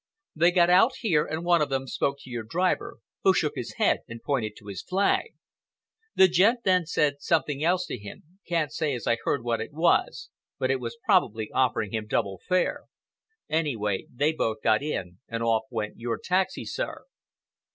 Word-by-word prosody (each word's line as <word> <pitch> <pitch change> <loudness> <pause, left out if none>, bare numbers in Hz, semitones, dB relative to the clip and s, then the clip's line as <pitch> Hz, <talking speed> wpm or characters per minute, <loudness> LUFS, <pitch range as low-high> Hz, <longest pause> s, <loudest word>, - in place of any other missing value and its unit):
They 170 +3 +5
got 175 -1 +4
out 210 +8 +5
here 165 -10 +2
and 160 +2 -4
one 175 -2 +4
of 150 - +1
them 135 -1 -1
spoke 140 +1 -1
to 130 - -13
your 120 -1 -3
driver, 175 +12 -1 0.2
who - - +4
shook - - +1
his - - -5
head - - +2
and 115 0 -8
pointed 115 -5 -1
to 105 - -16
his 100 -2 -6
flag. 200 - 0 0.8
The 190 - +7
gent 200 +7 +3
then 185 -3 +2
said 145 -3 +1
something 150 -2 0
else 180 +2 +2
to 125 - -5
him—can't 165 - -5
say 150 -5 -1
as 120 - -6
I 115 - +2
heard 140 - 0
what 115 -2 -1
it 115 - -6
was, 165 +3 +1 0.3
but 130 - 0
it 135 - 0
was 125 - -6
probably 120 - +2
offering 115 -5 0
him 110 -1 -3
double 95 -3 -1
fare. 185 -1 +1 0.6
Anyway, 115 -11 -1
they 145 +5 +1
both 110 -8 -2
got 110 +1 +3
in 95 -12 -4
and 115 0 -3
off 115 -1 +1
went 110 -3 -4
your 115 -1 -2
taxi, 185 +1 -1
sir." - - -4
145 Hz, 185 wpm, -26 LUFS, 115-175 Hz, 0.8 s, The